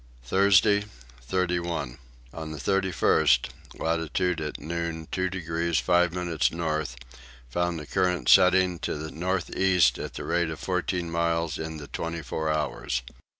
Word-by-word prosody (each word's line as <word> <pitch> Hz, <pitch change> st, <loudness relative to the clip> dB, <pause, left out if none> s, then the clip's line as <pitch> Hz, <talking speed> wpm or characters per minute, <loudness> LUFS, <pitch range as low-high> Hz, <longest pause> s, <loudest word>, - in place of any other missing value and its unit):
Thursday 100 Hz, -, +4 dB, 0.4 s
31. 85 Hz, -3 st, -2 dB, 0.3 s
On 80 Hz, -1 st, -6 dB
the 75 Hz, -, -6 dB
31st, 80 Hz, -2 st, +2 dB, 0.3 s
latitude 80 Hz, +1 st, -1 dB
at 75 Hz, -1 st, -4 dB
noon 80 Hz, 0 st, -4 dB
2 95 Hz, 0 st, 0 dB
degrees 85 Hz, -2 st, -1 dB
5 90 Hz, -1 st, +3 dB
minutes 85 Hz, -8 st, 0 dB
north, 80 Hz, -5 st, -2 dB, 0.5 s
found 85 Hz, +5 st, -1 dB
a 75 Hz, -, -8 dB
current 90 Hz, -5 st, 0 dB
setting 90 Hz, -1 st, +5 dB
to 75 Hz, -, -3 dB
the 80 Hz, +1 st, -6 dB
north 90 Hz, +2 st, -2 dB
east 90 Hz, -10 st, +3 dB
at -, -, -6 dB
the -, -, -5 dB
rate 85 Hz, -1 st, 0 dB
of 80 Hz, -, -6 dB
fourteen 90 Hz, -2 st, -2 dB
miles 85 Hz, -1 st, 0 dB
in 80 Hz, 0 st, -5 dB
the 75 Hz, -, -8 dB
twenty 85 Hz, +2 st, -4 dB
four 80 Hz, +2 st, -2 dB
hours. 75 Hz, -5 st, -1 dB
85 Hz, 145 wpm, -27 LUFS, 80-90 Hz, 0.5 s, setting